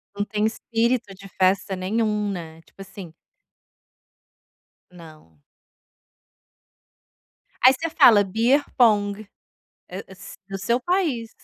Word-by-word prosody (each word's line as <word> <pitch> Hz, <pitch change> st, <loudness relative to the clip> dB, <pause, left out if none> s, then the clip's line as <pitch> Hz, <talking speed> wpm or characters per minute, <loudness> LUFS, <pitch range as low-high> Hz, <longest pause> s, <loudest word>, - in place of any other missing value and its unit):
Não 205 Hz, 0 st, -2 dB
tem 210 Hz, 0 st, -2 dB
espírito 230 Hz, -1 st, -1 dB
de 195 Hz, +1 st, -13 dB
festa 190 Hz, +1 st, 0 dB
nenhum, 210 Hz, +2 st, -1 dB
né, 165 Hz, -3 st, -8 dB
tipo 195 Hz, -, -17 dB
assim. 185 Hz, -4 st, -11 dB, 1.8 s
Não. 155 Hz, -, -17 dB, 2.2 s
Aí 260 Hz, +1 st, +8 dB
você 330 Hz, +5 st, -4 dB
fala 225 Hz, -10 st, +6 dB
beer 230 Hz, +9 st, +1 dB
pong, 210 Hz, -3 st, +2 dB, 1.2 s
do 195 Hz, 0 st, -6 dB
seu 235 Hz, +5 st, 0 dB
país. 285 Hz, -, -1 dB
205 Hz, 95 wpm, -23 LUFS, 190-235 Hz, 2.2 s, Aí